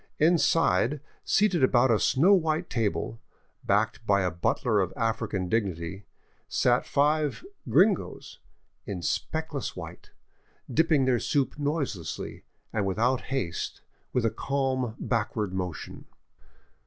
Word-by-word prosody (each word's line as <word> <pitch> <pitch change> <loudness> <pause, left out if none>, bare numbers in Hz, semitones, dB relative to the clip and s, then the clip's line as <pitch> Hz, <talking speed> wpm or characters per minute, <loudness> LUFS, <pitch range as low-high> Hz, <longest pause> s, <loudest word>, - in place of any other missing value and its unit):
Inside, 150 - +3 0.2
seated 195 -7 +2
about 130 -1 +4
a 110 - +3
snow 170 +10 +4
white 165 -2 +1
table, 115 0 -1 0.4
backed - - +1
by 100 -1 +4
a 90 - 0
butler 105 +6 +1
of 95 -3 0
African 110 -5 -1
dignity, 95 -2 -2 0.4
sat - - +2
five 150 - +1
" - - -14
gringos 195 0 +1 0.2
" - - -45
in 90 -3 -4
speckless 155 - -2
white, - - -9 0.6
dipping 160 -4 +3
their 125 -2 +2
soup 140 +2 0
noiselessly 140 - -3 0.3
and 105 -3 0
without 120 +7 +1
haste 95 -12 -3 0.3
with 125 -2 +1
a 115 - +2
calm 130 -4 -1
backward 110 -4 -1
motion. 90 -4 -5
125 Hz, 120 wpm, -27 LUFS, 100-150 Hz, 0.6 s, about